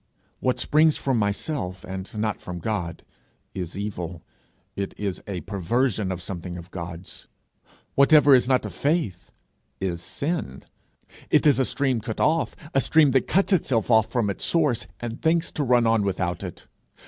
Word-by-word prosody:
What 130 Hz, -1 st, +1 dB
springs 155 Hz, +1 st, +4 dB
from 130 Hz, -4 st, 0 dB
myself 100 Hz, -, -2 dB
and 95 Hz, +3 st, -7 dB
not 110 Hz, -1 st, -1 dB
from 90 Hz, -1 st, -6 dB
God, 85 Hz, -2 st, -3 dB, 0.5 s
is 90 Hz, -1 st, -5 dB
evil; 90 Hz, -5 st, -5 dB, 0.5 s
it 100 Hz, 0 st, -4 dB
is 100 Hz, -3 st, -3 dB
a 95 Hz, -4 st, -4 dB
perversion 100 Hz, -, 0 dB
of 90 Hz, -1 st, -5 dB
something 90 Hz, -1 st, -5 dB
of 85 Hz, +1 st, -10 dB
God's. 85 Hz, 0 st, -7 dB, 0.7 s
Whatever 145 Hz, 0 st, +6 dB
is 125 Hz, -2 st, +5 dB
not 130 Hz, -1 st, +2 dB
of -, -, -6 dB
faith 140 Hz, -, -1 dB, 0.5 s
is 90 Hz, -3 st, -2 dB
sin; 140 Hz, -, -3 dB, 0.7 s
it -, -, +3 dB
is 145 Hz, -3 st, +5 dB
a 130 Hz, -, +3 dB
stream 130 Hz, -4 st, 0 dB
cut 110 Hz, 0 st, -5 dB
off 160 Hz, +2 st, +2 dB, 0.2 s
a 135 Hz, -, +3 dB
stream 155 Hz, -2 st, +4 dB
that 130 Hz, 0 st, +2 dB
cuts 195 Hz, +3 st, +2 dB
itself 125 Hz, -, +1 dB
off 110 Hz, -1 st, +4 dB
from 115 Hz, -5 st, +1 dB
its -, -, -5 dB
source, 150 Hz, -9 st, +1 dB
and 120 Hz, 0 st, -6 dB
thinks 165 Hz, +1 st, +2 dB
to 150 Hz, -, -2 dB
run 125 Hz, -2 st, +3 dB
on 115 Hz, -1 st, +3 dB
without 90 Hz, -3 st, -1 dB
it. -, -, -8 dB
110 Hz, 165 wpm, -25 LUFS, 95-135 Hz, 0.7 s, Whatever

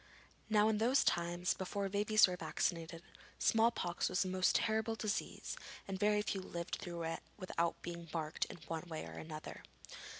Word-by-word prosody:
Now 215 Hz, -1 st, +5 dB
in 220 Hz, -1 st, +2 dB
those 250 Hz, +5 st, +4 dB
times, 175 Hz, +1 st, +1 dB
before 195 Hz, +1 st, -2 dB
babies 210 Hz, +2 st, +5 dB
were 180 Hz, -, -2 dB
vaccinated, 165 Hz, 0 st, -2 dB, 0.3 s
small 225 Hz, +1 st, +5 dB
pox 175 Hz, -6 st, -1 dB
was 185 Hz, +1 st, +1 dB
a -, -, -1 dB
most 185 Hz, 0 st, +2 dB
terrible 220 Hz, 0 st, +2 dB
disease 215 Hz, -1 st, -2 dB, 0.3 s
and 190 Hz, -1 st, -3 dB
very 210 Hz, +1 st, +3 dB
few 195 Hz, -2 st, -2 dB
lived 170 Hz, -1 st, -4 dB
through 170 Hz, -1 st, -4 dB
it 165 Hz, 0 st, -2 dB, 0.2 s
without 170 Hz, -3 st, -1 dB
being 170 Hz, -1 st, -6 dB
marked 160 Hz, -2 st, -1 dB
in -, -, -9 dB
one 165 Hz, +1 st, -4 dB
way 160 Hz, -1 st, -4 dB
or -, -, -8 dB
another. 155 Hz, -1 st, -7 dB
185 Hz, 170 wpm, -36 LUFS, 170-210 Hz, 0.3 s, Now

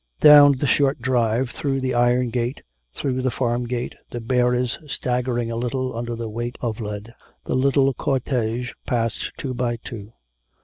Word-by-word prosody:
Down 145 Hz, -1 st, +9 dB
the 135 Hz, +2 st, -2 dB
short 140 Hz, 0 st, +2 dB
drive, 120 Hz, -1 st, +1 dB
through 135 Hz, -2 st, -2 dB
the 130 Hz, -1 st, -1 dB
iron 120 Hz, 0 st, +2 dB
gate, 120 Hz, +3 st, -2 dB, 0.3 s
through 130 Hz, -, -2 dB
the 130 Hz, -, +1 dB
farm 120 Hz, -1 st, -1 dB
gate, 120 Hz, 0 st, -3 dB, 0.2 s
the 120 Hz, -, -5 dB
bearers 125 Hz, +1 st, +1 dB
staggering 125 Hz, -3 st, -1 dB
a -, -, -3 dB
little 125 Hz, +1 st, -2 dB
under 120 Hz, 0 st, -3 dB
the 115 Hz, 0 st, -4 dB
weight 120 Hz, +3 st, -4 dB
of 115 Hz, -2 st, -3 dB
lead, 105 Hz, +1 st, -6 dB, 0.3 s
the -, -, -2 dB
little 135 Hz, +1 st, +3 dB
cortege 125 Hz, -2 st, -1 dB
passed 115 Hz, -2 st, -1 dB
two 130 Hz, -2 st, -4 dB
by 120 Hz, -1 st, -1 dB
two. 110 Hz, -2 st, -9 dB
125 Hz, 165 wpm, -23 LUFS, 115-130 Hz, 0.3 s, Down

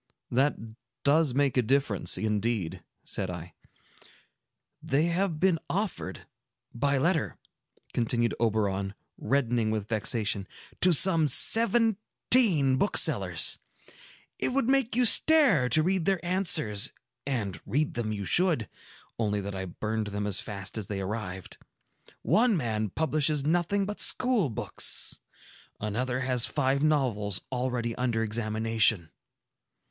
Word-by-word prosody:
"That 135 Hz, +4 st, +1 dB, 0.5 s
does 145 Hz, -2 st, +2 dB
make 140 Hz, -2 st, +1 dB
a -, -, +4 dB
difference, 125 Hz, -4 st, 0 dB
indeed," 105 Hz, -4 st, -2 dB, 0.2 s
said 95 Hz, -, -4 dB
I. 85 Hz, -1 st, -8 dB, 1.3 s
"They 140 Hz, +3 st, 0 dB
have 170 Hz, -1 st, -1 dB
been 180 Hz, -2 st, +2 dB
offered, 190 Hz, -, -4 dB, 0.5 s
by 140 Hz, +3 st, 0 dB
letter," 160 Hz, +3 st, -1 dB, 0.6 s
continued 120 Hz, 0 st, -1 dB
Oberon, 100 Hz, -3 st, -1 dB, 0.2 s
reddening 120 Hz, -5 st, 0 dB
with 110 Hz, -2 st, -3 dB
vexation, 105 Hz, -3 st, -1 dB, 0.3 s
"to 180 Hz, -, +7 dB
some 165 Hz, -1 st, +5 dB
seventeen 220 Hz, -, +3 dB
booksellers. 200 Hz, -, +3 dB, 0.8 s
It -, -, 0 dB
would 275 Hz, -3 st, 0 dB
make 265 Hz, -4 st, +1 dB
you 250 Hz, 0 st, +2 dB
stare 235 Hz, -, +5 dB
to 155 Hz, +6 st, +3 dB
read 185 Hz, -1 st, 0 dB
their 190 Hz, -3 st, -1 dB
answers; 170 Hz, -, +1 dB, 0.4 s
and 110 Hz, -9 st, -3 dB
read 150 Hz, +3 st, -1 dB
them 115 Hz, -2 st, -3 dB
you 100 Hz, -2 st, -5 dB
should, 165 Hz, -, +1 dB, 0.5 s
only 105 Hz, -2 st, -1 dB
that 100 Hz, +1 st, -6 dB
I 95 Hz, 0 st, -5 dB
burnt 110 Hz, +3 st, -4 dB
them 105 Hz, 0 st, -3 dB
as 100 Hz, -2 st, 0 dB
fast 100 Hz, +1 st, -5 dB
as 100 Hz, -, -6 dB
they 100 Hz, -2 st, -4 dB
arrived. 95 Hz, -2 st, -6 dB, 0.6 s
One 230 Hz, -2 st, +2 dB
man 110 Hz, -6 st, -2 dB
publishes 150 Hz, -, -1 dB
nothing 175 Hz, +5 st, 0 dB
but 210 Hz, +1 st, -6 dB
school 245 Hz, -, +1 dB
books; 110 Hz, -, 0 dB, 0.6 s
another 125 Hz, +5 st, -3 dB
has 125 Hz, -2 st, +1 dB
five 140 Hz, -1 st, -1 dB
novels 120 Hz, -10 st, 0 dB
already 125 Hz, -2 st, -2 dB
under 120 Hz, -3 st, -1 dB
examination." 110 Hz, -4 st, 0 dB
125 Hz, 120 wpm, -27 LUFS, 110-165 Hz, 1.3 s, to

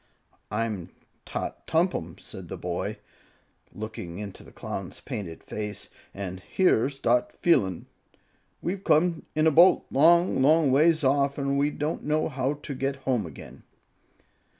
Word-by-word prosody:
"I'm 105 Hz, -4 st, -2 dB, 0.4 s
Tot -, -, -5 dB
Tompum," 160 Hz, -, 0 dB
said -, -, -10 dB
the -, -, -6 dB
boy, -, -, -3 dB, 0.7 s
looking 105 Hz, -5 st, -7 dB
up -, -, -4 dB
into 100 Hz, -2 st, -9 dB
the -, -, -15 dB
Clown's -, -, -6 dB
painted 85 Hz, -6 st, -6 dB
face, 105 Hz, -1 st, -5 dB, 0.2 s
"and 95 Hz, -2 st, -6 dB
here's 135 Hz, -, +1 dB
Dot 120 Hz, -2 st, +1 dB
F'eelun. 95 Hz, -, +2 dB, 0.8 s
We've 190 Hz, +2 st, -3 dB
come 165 Hz, +2 st, +2 dB
in 155 Hz, +1 st, +3 dB
a 160 Hz, -, +5 dB
boat, 170 Hz, +5 st, +6 dB
long, 170 Hz, +1 st, +4 dB
long 150 Hz, 0 st, +5 dB
ways 155 Hz, +3 st, +4 dB
off. 140 Hz, +1 st, +2 dB
An' 140 Hz, -1 st, 0 dB
we 140 Hz, +1 st, +2 dB
don't 150 Hz, +2 st, -3 dB
know 155 Hz, +2 st, +1 dB
how 135 Hz, 0 st, -1 dB
to 145 Hz, 0 st, -7 dB
get 135 Hz, +1 st, -2 dB
home 120 Hz, -8 st, +1 dB
again." 75 Hz, -, -12 dB
140 Hz, 145 wpm, -27 LUFS, 105-155 Hz, 0.8 s, boat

